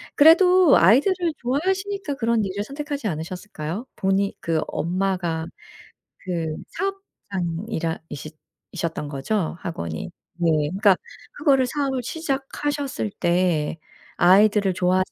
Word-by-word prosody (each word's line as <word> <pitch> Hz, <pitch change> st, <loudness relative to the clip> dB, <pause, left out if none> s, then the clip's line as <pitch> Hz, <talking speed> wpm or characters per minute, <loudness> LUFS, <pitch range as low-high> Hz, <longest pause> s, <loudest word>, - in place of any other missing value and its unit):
그래도 355 Hz, +2 st, +7 dB
아이들을 260 Hz, -, +5 dB, 0.2 s
좋아하시니까 375 Hz, +5 st, -1 dB
그런 230 Hz, -3 st, +1 dB
일을 195 Hz, +2 st, -3 dB
선택하지 285 Hz, 0 st, -4 dB
않으셨을까요? 180 Hz, +3 st, -5 dB
본인 195 Hz, +1 st, +1 dB
그 165 Hz, -2 st, 0 dB
엄마가 175 Hz, -2 st, -1 dB, 0.7 s
그 165 Hz, -4 st, -3 dB
사업장이라 195 Hz, -, -4 dB
이싰 150 Hz, +2 st, -7 dB, 0.4 s
이셨던 165 Hz, -3 st, -3 dB
거죠? 160 Hz, +6 st, -2 dB
학원이? 85 Hz, -, -5 dB, 0.3 s
네. 170 Hz, -, +2 dB, 0.2 s
그러니까 195 Hz, +2 st, +4 dB, 0.4 s
그거를 275 Hz, -, +3 dB
사업을 270 Hz, -3 st, -1 dB
시작하셨을 280 Hz, -3 st, -3 dB
때 175 Hz, -3 st, +1 dB, 0.4 s
아이들을 200 Hz, +2 st, +5 dB
좋아하지 185 Hz, 0 st, +1 dB
200 Hz, 295 characters per minute, -23 LUFS, 170-280 Hz, 0.7 s, 그래도